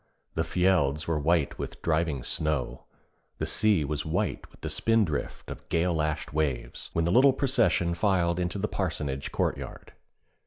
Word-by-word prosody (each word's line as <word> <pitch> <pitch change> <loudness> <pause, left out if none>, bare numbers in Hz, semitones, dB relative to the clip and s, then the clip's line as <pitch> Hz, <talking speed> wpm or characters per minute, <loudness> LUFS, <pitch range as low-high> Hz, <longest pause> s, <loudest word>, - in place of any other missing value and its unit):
The 80 - 0
fjelds 80 -3 +2
were 80 -2 0
white 80 0 +1
with - - -5
driving 80 -5 0
snow, 75 -3 -2 0.5
the - - -2
sea 105 -8 +2
was 75 +1 -2
white 80 - -2
with - - -22
the - - -3
spindrift 90 - 0
of - - -10
gale 85 +1 +2
lashed 75 -2 -1
waves, 70 -6 -2
when 85 - +1
the 85 - +1
little 130 +5 +6
procession 125 -10 +2
filed 85 -2 +1
into 90 +2 -1
the 105 +2 -1
parsonage 75 -9 -3
courtyard. - - -3
85 Hz, 155 wpm, -28 LUFS, 75-95 Hz, 0.5 s, little